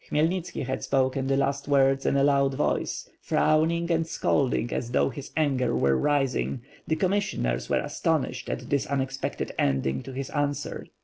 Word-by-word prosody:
Khmyelnitski 165 Hz, +1 st, 0 dB
had 130 Hz, -, -3 dB
spoken 130 Hz, 0 st, +1 dB
the 135 Hz, 0 st, +2 dB
last 140 Hz, 0 st, 0 dB
words 135 Hz, -1 st, +3 dB
in 140 Hz, -, +2 dB
a 140 Hz, -, +3 dB
loud 140 Hz, -1 st, +3 dB
voice, 150 Hz, -, -1 dB
frowning 170 Hz, +2 st, +2 dB
and 165 Hz, -1 st, +1 dB
scolding 130 Hz, -6 st, 0 dB
as 115 Hz, -, -2 dB
though 125 Hz, -, +2 dB
his 135 Hz, +3 st, -8 dB
anger 135 Hz, -5 st, +1 dB
were 70 Hz, -1 st, +3 dB
rising; 135 Hz, -, 0 dB, 0.2 s
the 160 Hz, -, +1 dB
commissioners 185 Hz, -, 0 dB
were -, -, +2 dB
astonished -, -, -1 dB
at -, -, -5 dB
this 140 Hz, -1 st, +1 dB
unexepected 135 Hz, -1 st, -2 dB
ending 65 Hz, -1 st, +1 dB
to -, -, -9 dB
his 135 Hz, +1 st, -5 dB
answer. 145 Hz, -1 st, -2 dB
140 Hz, 165 wpm, -26 LUFS, 130-150 Hz, 0.2 s, words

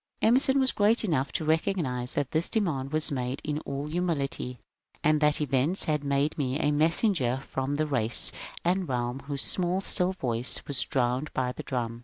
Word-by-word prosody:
Emerson 265 Hz, +4 st, +4 dB
was 260 Hz, -1 st, +3 dB
great 215 Hz, +3 st, +2 dB
enough 150 Hz, -9 st, 0 dB
to 160 Hz, -, -3 dB
recognize 155 Hz, -6 st, 0 dB
that 140 Hz, -2 st, -1 dB
this 160 Hz, +2 st, +1 dB
demand 150 Hz, -11 st, -1 dB
was 155 Hz, -1 st, +3 dB
made 130 Hz, 0 st, -2 dB
in 150 Hz, -1 st, -2 dB
all 140 Hz, +1 st, -3 dB
humility, 150 Hz, -6 st, -2 dB, 0.5 s
and 155 Hz, 0 st, +3 dB
that 150 Hz, -1 st, +3 dB
events 145 Hz, +5 st, +1 dB
had 150 Hz, -2 st, -1 dB
made 140 Hz, +1 st, 0 dB
me 135 Hz, 0 st, -1 dB
a 150 Hz, -2 st, +1 dB
messenger 155 Hz, -, +2 dB
from 135 Hz, +1 st, -3 dB
the 155 Hz, +1 st, 0 dB
race 120 Hz, -6 st, +1 dB, 0.3 s
and 180 Hz, -1 st, 0 dB
realm 120 Hz, 0 st, -2 dB
whose 140 Hz, -2 st, -1 dB
small 180 Hz, 0 st, +1 dB
still 185 Hz, -1 st, +2 dB
voice 125 Hz, -7 st, 0 dB
was 140 Hz, -2 st, +1 dB
drowned 130 Hz, +2 st, -1 dB
by 125 Hz, -1 st, -1 dB
the -, -, -7 dB
drum. 115 Hz, -3 st, -4 dB
145 Hz, 180 wpm, -27 LUFS, 130-170 Hz, 0.5 s, Emerson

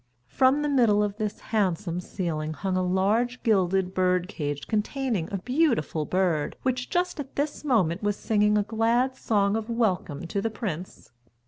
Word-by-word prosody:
From 265 Hz, -, +3 dB
the -, -, 0 dB
middle 235 Hz, -7 st, +3 dB
of 205 Hz, 0 st, -3 dB
this 215 Hz, -2 st, -3 dB
handsome 185 Hz, -4 st, 0 dB
ceiling 160 Hz, -4 st, -3 dB
hung 190 Hz, +3 st, -2 dB
a 185 Hz, -, +1 dB
large 205 Hz, +7 st, +1 dB
gilded 190 Hz, -3 st, +2 dB
bird 180 Hz, -1 st, +1 dB
cage 145 Hz, -7 st, -4 dB
containing 220 Hz, -, -1 dB
a 200 Hz, -, -1 dB
beautiful 240 Hz, -, 0 dB
bird, 180 Hz, -5 st, 0 dB
which 250 Hz, -1 st, -1 dB
just 355 Hz, -2 st, -1 dB
at 275 Hz, -2 st, -7 dB
this 290 Hz, +1 st, -2 dB
moment 195 Hz, -, +1 dB
was 205 Hz, -1 st, 0 dB
singing 210 Hz, 0 st, +2 dB
a 205 Hz, -, +2 dB
glad 230 Hz, +4 st, +1 dB
song 205 Hz, -4 st, +1 dB
of 225 Hz, +1 st, -3 dB
welcome 190 Hz, -11 st, -1 dB
to 195 Hz, +4 st, -2 dB
the 225 Hz, -, 0 dB
prince. 185 Hz, -6 st, -6 dB
205 Hz, 165 wpm, -26 LUFS, 180-240 Hz, -, From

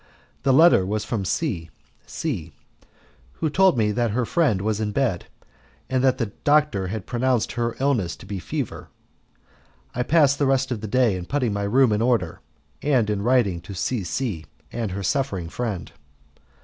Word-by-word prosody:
The 135 Hz, -, +2 dB
letter 155 Hz, -, +6 dB
was 105 Hz, +3 st, -2 dB
from 110 Hz, -5 st, -2 dB
C 90 Hz, -, -2 dB, 0.4 s
C, 90 Hz, -, -4 dB, 0.8 s
who 160 Hz, -2 st, -2 dB
told 190 Hz, -3 st, +4 dB
me 105 Hz, -2 st, +2 dB
that 120 Hz, +2 st, 0 dB
her 120 Hz, +3 st, 0 dB
friend 135 Hz, -, +2 dB
was 105 Hz, +1 st, -1 dB
in 105 Hz, -1 st, -1 dB
bed, 115 Hz, -7 st, -1 dB, 0.6 s
and 130 Hz, -1 st, +1 dB
that 130 Hz, -1 st, +3 dB
the 115 Hz, -6 st, -2 dB
doctor 145 Hz, -10 st, +3 dB
had 100 Hz, 0 st, -5 dB
pronounced 125 Hz, -1 st, 0 dB
her 120 Hz, -1 st, -2 dB
illness 125 Hz, -11 st, 0 dB
to -, -, -14 dB
be 100 Hz, -1 st, -5 dB
fever. -, -, -5 dB, 1.0 s
I 125 Hz, -, -2 dB
passed 145 Hz, 0 st, +3 dB
the 140 Hz, -, +2 dB
rest 135 Hz, -1 st, +1 dB
of 115 Hz, -4 st, -2 dB
the 110 Hz, -, -4 dB
day 120 Hz, -2 st, +2 dB
in 90 Hz, -1 st, -6 dB
putting 130 Hz, -7 st, 0 dB
my 100 Hz, 0 st, -2 dB
room 125 Hz, +3 st, +4 dB
in 105 Hz, +1 st, +1 dB
order, 105 Hz, -8 st, +1 dB, 0.4 s
and 125 Hz, -7 st, +2 dB
in 100 Hz, -1 st, -1 dB
writing 110 Hz, -7 st, +2 dB
to 95 Hz, +3 st, -9 dB
C 110 Hz, +3 st, -1 dB
C 90 Hz, -, -3 dB, 0.2 s
and 115 Hz, -3 st, -3 dB
her 100 Hz, +1 st, -4 dB
suffering 95 Hz, -7 st, -1 dB
friend. 110 Hz, -4 st, -4 dB
115 Hz, 175 wpm, -23 LUFS, 100-130 Hz, 1.0 s, letter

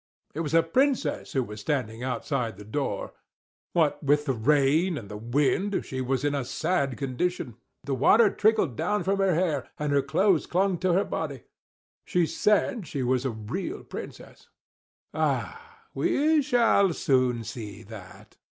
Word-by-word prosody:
It 155 Hz, -, -5 dB
was 165 Hz, -1 st, -1 dB
a 165 Hz, -, +6 dB
Princess 250 Hz, -, 0 dB
who 130 Hz, -, +1 dB
was 105 Hz, -2 st, -8 dB
standing 120 Hz, -4 st, -2 dB
outside 125 Hz, -2 st, -2 dB
the 105 Hz, -, -10 dB
door. 110 Hz, -3 st, -3 dB, 0.6 s
What 160 Hz, -4 st, +2 dB
with 145 Hz, +1 st, +2 dB
the 135 Hz, -, +1 dB
rain 150 Hz, +8 st, +2 dB
and 105 Hz, -7 st, -8 dB
the 105 Hz, -, -7 dB
wind, 140 Hz, -, 0 dB
she 130 Hz, -1 st, -4 dB
was 130 Hz, +1 st, -1 dB
in 145 Hz, -, +1 dB
a 140 Hz, -2 st, -1 dB
sad 140 Hz, 0 st, -1 dB
condition; 135 Hz, -2 st, -3 dB, 0.3 s
the 140 Hz, -, -3 dB
water 205 Hz, -, +5 dB
trickled 210 Hz, -, +2 dB
down 210 Hz, -, -1 dB
from 195 Hz, +1 st, 0 dB
her 190 Hz, -3 st, +3 dB
hair, 160 Hz, -6 st, -1 dB
and 150 Hz, -1 st, -2 dB
her 140 Hz, -, +4 dB
clothes 165 Hz, +5 st, +2 dB
clung 185 Hz, 0 st, +1 dB
to 185 Hz, 0 st, +1 dB
her 195 Hz, +3 st, +2 dB
body. 140 Hz, -6 st, -4 dB, 0.6 s
She 175 Hz, -1 st, +1 dB
said 210 Hz, -, +1 dB
she 140 Hz, -2 st, -3 dB
was 125 Hz, +1 st, 0 dB
a -, -, +1 dB
real 160 Hz, -, -5 dB
Princess. -, -, -10 dB, 0.6 s
"Ah! -, -, -3 dB
we 305 Hz, +1 st, +2 dB
shall 235 Hz, -, +3 dB
soon 130 Hz, -5 st, +1 dB
see 110 Hz, -3 st, -8 dB
that!" 100 Hz, -1 st, -13 dB
145 Hz, 160 wpm, -26 LUFS, 125-185 Hz, 0.6 s, a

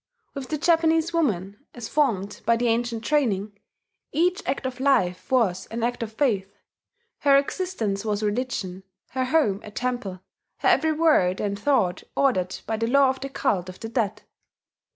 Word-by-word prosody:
With 275 Hz, -3 st, -6 dB
the 305 Hz, -, -1 dB
Japanese 325 Hz, +1 st, +2 dB
woman, 205 Hz, -, -1 dB
as 240 Hz, -2 st, -6 dB
formed 210 Hz, -10 st, 0 dB
by 230 Hz, -, +3 dB
the 240 Hz, +1 st, 0 dB
ancient 230 Hz, 0 st, -1 dB
training, 210 Hz, -9 st, 0 dB, 0.5 s
each 355 Hz, +4 st, +1 dB
act 265 Hz, +1 st, -2 dB
of 255 Hz, 0 st, -4 dB
life 225 Hz, -10 st, +1 dB
was 200 Hz, -8 st, +2 dB
an 230 Hz, 0 st, -4 dB
act 245 Hz, +1 st, -1 dB
of 225 Hz, -1 st, -4 dB
faith: 205 Hz, -6 st, -1 dB, 0.6 s
her 280 Hz, -1 st, +5 dB
existence 275 Hz, -, -1 dB
was 210 Hz, -1 st, -1 dB
a -, -, +2 dB
religion, 205 Hz, -5 st, -2 dB, 0.3 s
her 260 Hz, +1 st, -1 dB
home 255 Hz, -9 st, +2 dB
a -, -, -8 dB
temple, 240 Hz, -5 st, -3 dB, 0.4 s
her -, -, -1 dB
every 315 Hz, 0 st, +3 dB
word 300 Hz, -, +3 dB
and 200 Hz, -1 st, -2 dB
thought 200 Hz, -9 st, +1 dB
ordered 185 Hz, -10 st, +1 dB
by 220 Hz, 0 st, -2 dB
the 230 Hz, +1 st, -1 dB
law 275 Hz, +2 st, +5 dB
of 265 Hz, -, -8 dB
the 275 Hz, -, -5 dB
cult 200 Hz, -10 st, -1 dB
of 185 Hz, -, -10 dB
the 225 Hz, -, -6 dB
dead.... 215 Hz, -3 st, -1 dB
235 Hz, 170 wpm, -25 LUFS, 200-280 Hz, 0.6 s, her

